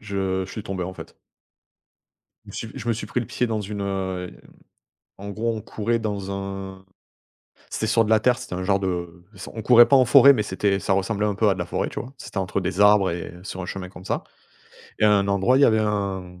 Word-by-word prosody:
je 95 Hz, -2 st, -2 dB
je -, -, -11 dB
suis 110 Hz, -, -6 dB
tombé, 95 Hz, -3 st, -4 dB
en 95 Hz, +1 st, -6 dB
fait. -, -, -11 dB, 1.3 s
Je -, -, -11 dB
me -, -, -12 dB, 0.2 s
suis -, -, -9 dB
je 120 Hz, -2 st, -6 dB
me -, -, +3 dB
suis 115 Hz, -, -5 dB
pris 125 Hz, -, -2 dB
le 120 Hz, -, -5 dB
pied 125 Hz, -1 st, -1 dB
dans 110 Hz, -2 st, -2 dB
une, 105 Hz, 0 st, -5 dB
hem, 95 Hz, -2 st, -3 dB, 0.9 s
en 100 Hz, +1 st, -8 dB
gros, 115 Hz, +3 st, -2 dB
on 110 Hz, -, -5 dB
courait 115 Hz, +3 st, -2 dB
dans 100 Hz, -3 st, -4 dB
un 95 Hz, -1 st, -6 dB, 0.8 s
c'était 110 Hz, -, -3 dB
sur 115 Hz, +1 st, +3 dB
de 105 Hz, -, -3 dB
la 110 Hz, -, +6 dB
terre. 125 Hz, +2 st, +2 dB
C'était -, -, -7 dB
un 95 Hz, -, -3 dB
genre 100 Hz, +1 st, +2 dB
de 85 Hz, -2 st, -4 dB
s 95 Hz, -, -9 dB
on 110 Hz, -, -6 dB
courait 120 Hz, 0 st, +7 dB
pas 140 Hz, -, +5 dB
en 130 Hz, -, +5 dB
forêt. 140 Hz, +2 st, +8 dB
Mais 115 Hz, -6 st, 0 dB
c'était 100 Hz, 0 st, 0 dB
ça 95 Hz, -, 0 dB
ressemblait 100 Hz, +2 st, 0 dB
un 105 Hz, -, 0 dB
peu 105 Hz, +2 st, +2 dB
à 100 Hz, -, +3 dB
de -, -, -10 dB
la 90 Hz, -, -3 dB
forêt, -, -, -2 dB
tu -, -, -5 dB
vois? 125 Hz, +3 st, -8 dB
C'était 105 Hz, -, -7 dB
entre 95 Hz, +1 st, -1 dB
des 95 Hz, +1 st, -3 dB
arbres 105 Hz, -2 st, +5 dB
et 85 Hz, 0 st, -6 dB
sur 95 Hz, 0 st, -7 dB
un 90 Hz, -, -5 dB
chemin 90 Hz, 0 st, -6 dB
comme 90 Hz, -1 st, -13 dB
ça -, -, -2 dB, 0.7 s
et -, -, +2 dB
à 105 Hz, -, +6 dB
un 100 Hz, -1 st, +2 dB
endroit, 100 Hz, +6 st, +3 dB
il -, -, +3 dB
y -, -, +7 dB
avait 110 Hz, -3 st, +4 dB
un 95 Hz, -4 st, -3 dB
100 Hz, 250 wpm, -23 LUFS, 95-110 Hz, 1.3 s, forêt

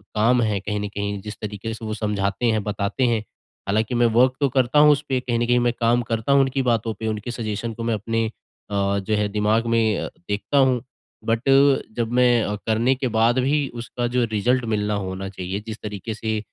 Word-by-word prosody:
काम 120 Hz, +3 st, +3 dB
है 105 Hz, -3 st, 0 dB
कहीं 105 Hz, +1 st, -3 dB
न 105 Hz, -, -3 dB
कहीं 100 Hz, 0 st, -4 dB
जिस 105 Hz, +1 st, -8 dB
तरीके 105 Hz, +1 st, -5 dB
से 110 Hz, 0 st, -8 dB
वो 110 Hz, -, -3 dB
समझाते 105 Hz, 0 st, -1 dB
हैं, 110 Hz, -1 st, 0 dB
बताते 100 Hz, +3 st, -2 dB
हैं। 115 Hz, -3 st, 0 dB, 0.4 s
हालाँकि 110 Hz, +4 st, 0 dB
मैं 120 Hz, 0 st, +3 dB
वर्क 130 Hz, +2 st, +5 dB
तो 140 Hz, -2 st, +2 dB
करता 130 Hz, +2 st, +2 dB
हूँ 150 Hz, 0 st, +7 dB
उसपे, 140 Hz, -2 st, 0 dB
कहीं 120 Hz, -2 st, -1 dB
न 120 Hz, -, +1 dB
कहीं 125 Hz, 0 st, +3 dB
मैं 120 Hz, -, +2 dB
काम 120 Hz, +1 st, +3 dB
करता 115 Hz, +2 st, -2 dB
हूँ 140 Hz, 0 st, +6 dB
उनकी 135 Hz, 0 st, 0 dB
बातों 115 Hz, -1 st, 0 dB
पे, 110 Hz, +2 st, -5 dB
उनके 110 Hz, +2 st, -3 dB
सजेशन 115 Hz, -1 st, -4 dB
को 115 Hz, -, -6 dB
मैं 115 Hz, 0 st, 0 dB
अपने 115 Hz, +2 st, -1 dB, 0.5 s
अ, 100 Hz, 0 st, +1 dB
जो 105 Hz, +2 st, -1 dB
है 105 Hz, 0 st, +1 dB
दिमाग़ 105 Hz, +3 st, +1 dB
में 115 Hz, -2 st, +1 dB, 0.2 s
देखता 105 Hz, +7 st, -1 dB
हूँ। 130 Hz, -3 st, +4 dB, 0.4 s
बट 115 Hz, 0 st, +1 dB, 0.6 s
जब 115 Hz, 0 st, -1 dB
मैं 120 Hz, -4 st, +3 dB
करने 115 Hz, +4 st, +3 dB
के 130 Hz, 0 st, -2 dB
बाद 120 Hz, +3 st, +3 dB
भी 140 Hz, +2 st, +1 dB
उसका 120 Hz, +1 st, -3 dB
जो 125 Hz, -, +3 dB
रिज़ल्ट 120 Hz, +4 st, +1 dB
मिलना 105 Hz, -1 st, -1 dB
होना 95 Hz, +1 st, -5 dB
चाहिए, 95 Hz, +1 st, -5 dB
जिस 110 Hz, -, -5 dB
तरीके 105 Hz, +1 st, -5 dB
से 110 Hz, 0 st, -2 dB
115 Hz, 210 wpm, -23 LUFS, 105-120 Hz, 0.6 s, हूँ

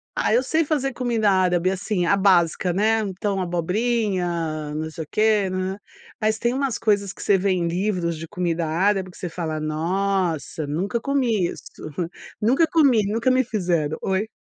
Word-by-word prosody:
Ah, -, -, +1 dB
eu 250 Hz, +3 st, +3 dB
sei 320 Hz, +5 st, +1 dB
fazer 275 Hz, -3 st, 0 dB
comida 230 Hz, -5 st, +1 dB
árabe 185 Hz, -1 st, +2 dB
assim, 190 Hz, -1 st, -1 dB
a 200 Hz, -, +4 dB
básica 180 Hz, -2 st, +3 dB
né, 220 Hz, +3 st, +2 dB
então 195 Hz, -1 st, -2 dB
abobrinha, 175 Hz, -5 st, -1 dB
não 160 Hz, +1 st, -3 dB
sei 160 Hz, -, -6 dB
o -, -, -15 dB
quê, 215 Hz, -2 st, +2 dB
hum, 185 Hz, +1 st, -2 dB, 0.5 s
mas 215 Hz, 0 st, +1 dB
tem 240 Hz, +2 st, 0 dB
umas 270 Hz, -3 st, -1 dB
coisas 200 Hz, -3 st, +1 dB
que -, -, -10 dB
você 200 Hz, -, +4 dB
vê 195 Hz, +1 st, +1 dB
em 180 Hz, -3 st, +1 dB
livros 175 Hz, -2 st, -1 dB
de 165 Hz, +1 st, -7 dB
comida 170 Hz, -1 st, -1 dB
árabe 190 Hz, +3 st, +1 dB
que -, -, -15 dB
você 180 Hz, -, -4 dB
fala: 160 Hz, -2 st, -3 dB
"Nossa 165 Hz, 0 st, -1 dB
nunca 195 Hz, +10 st, -2 dB
comi 240 Hz, -10 st, +1 dB
isso. -, -, -8 dB, 0.8 s
Nunca 265 Hz, +10 st, +3 dB
comi, 275 Hz, -9 st, +4 dB
nunca 230 Hz, +4 st, +1 dB
me 260 Hz, 0 st, +3 dB
fizeram". 175 Hz, -9 st, -1 dB
Oi. 190 Hz, +3 st, 0 dB
190 Hz, 175 wpm, -23 LUFS, 170-220 Hz, 0.8 s, a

